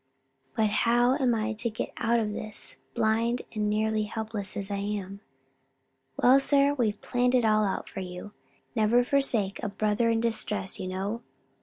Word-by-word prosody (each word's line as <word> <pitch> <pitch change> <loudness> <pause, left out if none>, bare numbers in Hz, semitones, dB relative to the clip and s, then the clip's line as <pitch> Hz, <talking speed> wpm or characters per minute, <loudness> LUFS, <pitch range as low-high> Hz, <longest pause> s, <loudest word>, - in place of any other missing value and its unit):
"But 215 -2 +2
how 240 +3 +3
am 255 -5 +2
I 220 0 -1
to 230 +2 -2
get 220 - -5
out 235 +1 +2
of 210 -2 -1
this? 215 0 -3 0.2
blind 230 +1 +1
and 210 -1 0
nearly 215 0 +1
helpless 215 -2 -5
as 200 0 -4
I 200 - -1
am?" 200 -1 -4 1.0
"Well, 260 +2 +6
sir, 280 +1 +3
we've 220 -7 0
planned 250 +1 +1
it 245 -2 +3
all 215 -1 +4
out 195 -2 -2
for - - -7
you 180 +2 -7 0.4
never 225 +2 +4
forsake 245 -7 +1
a 215 - -2
brother 215 +3 +1
in 230 0 +2
distress, 210 -4 -2
you 185 - -4
know. 195 +5 -3
220 Hz, 170 wpm, -28 LUFS, 205-235 Hz, 1.0 s, Well